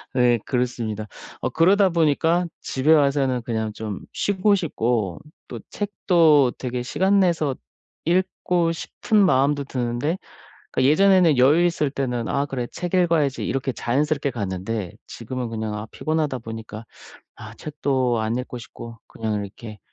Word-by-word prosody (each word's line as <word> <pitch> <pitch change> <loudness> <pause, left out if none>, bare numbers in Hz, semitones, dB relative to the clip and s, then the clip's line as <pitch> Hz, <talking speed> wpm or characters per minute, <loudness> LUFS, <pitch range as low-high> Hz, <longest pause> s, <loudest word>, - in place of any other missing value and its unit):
네 120 -2 +4
그렇습니다. 115 -4 -2 0.3
어 - - -2
그러다 190 +4 +4
보니까 165 +2 +2
집에 140 +4 +1
와서는 140 -4 +2
그냥 110 -2 -2
좀 105 -2 -6
쉬고 205 +1 +2
싶고 115 - -1 0.3
또 - - -7
책도 165 -9 +3
되게 125 -1 -3
시간 190 +9 +2
내서 160 -7 +1 0.5
읽고 175 -1 +1
싶은 205 +5 0
마음도 140 -2 +2
드는데 130 +6 -2 0.5
그러니까 130 +1 +3
예전에는 180 -4 +5
여유 150 +7 +5
있을 160 -4 +1
때는 125 -5 -2
'아 140 +1 0
그래 125 -3 -3
책 180 0 -5
읽어야지.' 165 -6 +2
이렇게 135 0 -1
자연스럽게 140 +3 0
갔는데 100 -2 -4
지금은 120 +1 -5
그냥 110 -1 -4
아 105 +1 -5
피곤하다 155 -4 -1
보니까 110 -1 -8 0.5
아 - - -10
책도 135 -5 -1
안 110 +2 -1
읽고 125 -1 -5
싶고 115 0 -10
그냥 110 -2 -3
이렇게 105 +2 -10
135 Hz, 310 characters per minute, -23 LUFS, 115-165 Hz, 0.5 s, 예전에는